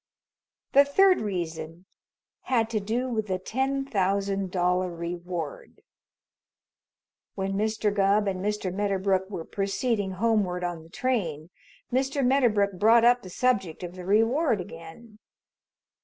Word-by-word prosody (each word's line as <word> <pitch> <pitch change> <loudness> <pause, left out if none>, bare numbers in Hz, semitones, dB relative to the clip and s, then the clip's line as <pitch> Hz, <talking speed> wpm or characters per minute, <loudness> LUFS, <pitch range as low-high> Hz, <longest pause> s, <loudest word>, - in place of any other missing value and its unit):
The 280 - +7
third 370 +7 +4
reason 170 -4 -5 0.6
had 230 -3 +1
to 220 - 0
do 230 +5 -2
with 220 -4 -2
the 185 -1 -1
ten 265 +8 -2
thousand 195 -3 0
dollar 180 0 +1
reward. 175 - -6 1.5
When 195 0 -2
Mr. 215 0 0
Gubb 200 +1 +2
and 185 -1 -2
Mr. 210 -3 -2
Medderbrook 195 -1 0
were 170 -5 -6
proceeding 200 0 -1
homeward 195 -3 0
on 175 -2 -3
the 160 - -16
train, 175 - -2 0.4
Mr. 270 +1 +1
Medderbrook 215 -8 +2
brought 230 +2 +5
up 245 +1 +5
the 185 - -10
subject 195 -6 0
of 175 0 -6
the 180 -1 -9
reward 225 - +2
again. 180 +6 -11
200 Hz, 125 wpm, -26 LUFS, 180-235 Hz, 1.5 s, The